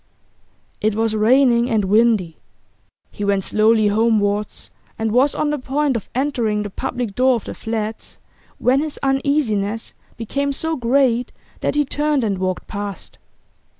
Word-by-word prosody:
It 215 Hz, 0 st, +1 dB
was 225 Hz, 0 st, 0 dB
raining 240 Hz, +2 st, +4 dB
and 215 Hz, -4 st, +1 dB
windy. 210 Hz, -5 st, +2 dB, 0.7 s
He 205 Hz, -, -6 dB
went 200 Hz, -1 st, +1 dB
slowly 215 Hz, +1 st, +3 dB
homewards, 210 Hz, -1 st, 0 dB, 0.3 s
and 220 Hz, -1 st, -1 dB
was 260 Hz, +5 st, +3 dB
on 295 Hz, -, 0 dB
the 295 Hz, -, -2 dB
point 275 Hz, +1 st, 0 dB
of 225 Hz, -, -5 dB
entering 240 Hz, -6 st, 0 dB
the 205 Hz, -, -6 dB
public 245 Hz, -2 st, -4 dB
door 255 Hz, +3 st, +3 dB
of 230 Hz, -, -4 dB
the -, -, -6 dB
flats 220 Hz, -1 st, -5 dB, 0.4 s
when 260 Hz, +2 st, +2 dB
his 305 Hz, 0 st, -3 dB
uneasiness 265 Hz, -6 st, 0 dB, 0.2 s
became 280 Hz, +5 st, -2 dB
so 320 Hz, +3 st, -1 dB
great 250 Hz, -1 st, +1 dB, 0.3 s
that -, -, -1 dB
he 295 Hz, 0 st, +2 dB
turned 295 Hz, -1 st, 0 dB
and 200 Hz, -4 st, -1 dB
walked 185 Hz, -1 st, -2 dB
past. 200 Hz, -2 st, -7 dB
230 Hz, 150 wpm, -20 LUFS, 210-270 Hz, 0.7 s, raining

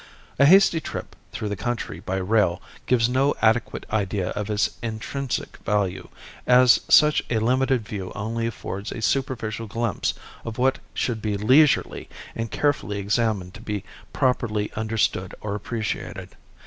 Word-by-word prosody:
A 140 Hz, -, +7 dB
hasty 190 Hz, -1 st, +6 dB
trip -, -, -7 dB, 0.2 s
through 105 Hz, -2 st, -4 dB
the 105 Hz, -, -2 dB
country 115 Hz, -5 st, -4 dB
by 95 Hz, 0 st, -4 dB
rail 95 Hz, -2 st, +2 dB, 0.3 s
gives 115 Hz, -3 st, +3 dB
no 135 Hz, +3 st, +2 dB
adequate 115 Hz, +1 st, +1 dB
idea 100 Hz, -3 st, -1 dB
of 105 Hz, 0 st, -4 dB
its 105 Hz, 0 st, +1 dB
intrinsic 120 Hz, +4 st, -4 dB
value, 100 Hz, -3 st, -1 dB, 0.4 s
as 125 Hz, 0 st, +6 dB
such 150 Hz, 0 st, +6 dB
a 115 Hz, -, +1 dB
limited 125 Hz, 0 st, +1 dB
view 95 Hz, -3 st, -5 dB
only 115 Hz, +3 st, -2 dB
affords 100 Hz, -3 st, -5 dB
a 110 Hz, -, -5 dB
superficial 115 Hz, -4 st, -1 dB
glimpse 115 Hz, 0 st, -1 dB, 0.3 s
of 115 Hz, -1 st, -6 dB
what 130 Hz, +1 st, +2 dB, 0.2 s
should 115 Hz, -3 st, -1 dB
be 105 Hz, -2 st, -1 dB
leisurely 135 Hz, +8 st, +3 dB, 0.3 s
and 115 Hz, 0 st, -3 dB
carefully 145 Hz, -8 st, 0 dB
examined 100 Hz, -2 st, 0 dB
to -, -, -11 dB
be 105 Hz, -2 st, -4 dB, 0.3 s
properly 120 Hz, -6 st, 0 dB
understood 110 Hz, -4 st, -1 dB
or 105 Hz, -1 st, -4 dB
appreciated. 110 Hz, +1 st, -4 dB
110 Hz, 145 wpm, -24 LUFS, 105-125 Hz, 0.4 s, A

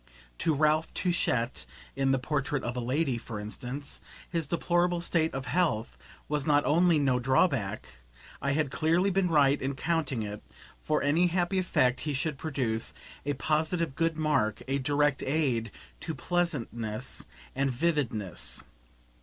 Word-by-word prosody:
To 160 Hz, -, +2 dB
Ralph 155 Hz, +2 st, +2 dB
Touchett 130 Hz, -9 st, 0 dB, 0.3 s
in 135 Hz, 0 st, +1 dB
"The 135 Hz, -, +4 dB
Portrait 140 Hz, +1 st, -1 dB
of 120 Hz, +1 st, -3 dB
a -, -, -1 dB
Lady," 130 Hz, +1 st, 0 dB
for 110 Hz, -2 st, -6 dB
instance, 125 Hz, +7 st, -5 dB, 0.3 s
his 165 Hz, -4 st, -2 dB
deplorable 175 Hz, +2 st, +1 dB
state 165 Hz, -1 st, +1 dB
of 135 Hz, -1 st, -3 dB
health 125 Hz, -5 st, 0 dB, 0.3 s
was 150 Hz, -1 st, -1 dB
not 145 Hz, -1 st, +4 dB
only 170 Hz, +2 st, +4 dB
no 135 Hz, -4 st, +2 dB
drawback; 125 Hz, -, +1 dB, 0.4 s
I 140 Hz, +1 st, +1 dB
had 150 Hz, -2 st, 0 dB
clearly 170 Hz, +6 st, +2 dB
been 190 Hz, 0 st, +2 dB
right 145 Hz, -4 st, +4 dB
in 135 Hz, +1 st, -2 dB
counting 145 Hz, -7 st, 0 dB
it, 105 Hz, 0 st, -6 dB, 0.4 s
for 155 Hz, -1 st, 0 dB
any 160 Hz, +5 st, +4 dB
happy 180 Hz, +2 st, +1 dB
effect 130 Hz, -8 st, +2 dB
he 150 Hz, -2 st, -2 dB
should 135 Hz, 0 st, -2 dB
produce, 125 Hz, -8 st, -2 dB, 0.3 s
a 145 Hz, -, +2 dB
positive 155 Hz, +3 st, 0 dB
good 165 Hz, +1 st, 0 dB
mark, 145 Hz, -9 st, +1 dB
a 135 Hz, +1 st, 0 dB
direct 145 Hz, +1 st, +2 dB
aid 130 Hz, -6 st, 0 dB, 0.3 s
to 160 Hz, -, -4 dB
pleasantness 120 Hz, -11 st, -2 dB, 0.3 s
and 135 Hz, 0 st, +1 dB
vividness. 125 Hz, -, -1 dB
145 Hz, 145 wpm, -29 LUFS, 125-165 Hz, 0.4 s, The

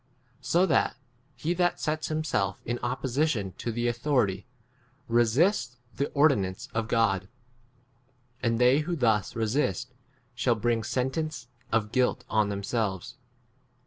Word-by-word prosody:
So 175 Hz, +3 st, +3 dB
that 155 Hz, -8 st, +2 dB, 0.4 s
he 155 Hz, +8 st, -1 dB
that 175 Hz, 0 st, +1 dB
sets 155 Hz, 0 st, -1 dB
himself 155 Hz, -12 st, -1 dB
in 120 Hz, +1 st, -2 dB
opposition 125 Hz, -4 st, 0 dB
to 120 Hz, -, -2 dB
the 120 Hz, +1 st, -1 dB
authority 120 Hz, -5 st, 0 dB, 0.6 s
resists 120 Hz, -, +2 dB, 0.2 s
the 140 Hz, -, 0 dB
ordi 140 Hz, -4 st, +5 dB
nance 95 Hz, -1 st, -5 dB
of 115 Hz, 0 st, -1 dB
God; 105 Hz, -5 st, +1 dB, 1.1 s
and 115 Hz, -2 st, +1 dB
they 125 Hz, +4 st, +5 dB
who 170 Hz, +3 st, -2 dB
[thus] 110 Hz, -, +1 dB
resist 115 Hz, -1 st, -1 dB, 0.4 s
shall 120 Hz, 0 st, +1 dB
bring 115 Hz, +1 st, +1 dB
x 110 Hz, +1 st, -5 dB
sentence 130 Hz, +1 st, -2 dB, 0.2 s
of 110 Hz, -2 st, +1 dB
guilt 125 Hz, -1 st, +1 dB
3 -, -, -25 dB
on 110 Hz, -2 st, +2 dB
themselves. 100 Hz, +3 st, -2 dB
120 Hz, 135 wpm, -28 LUFS, 110-140 Hz, 1.1 s, ordi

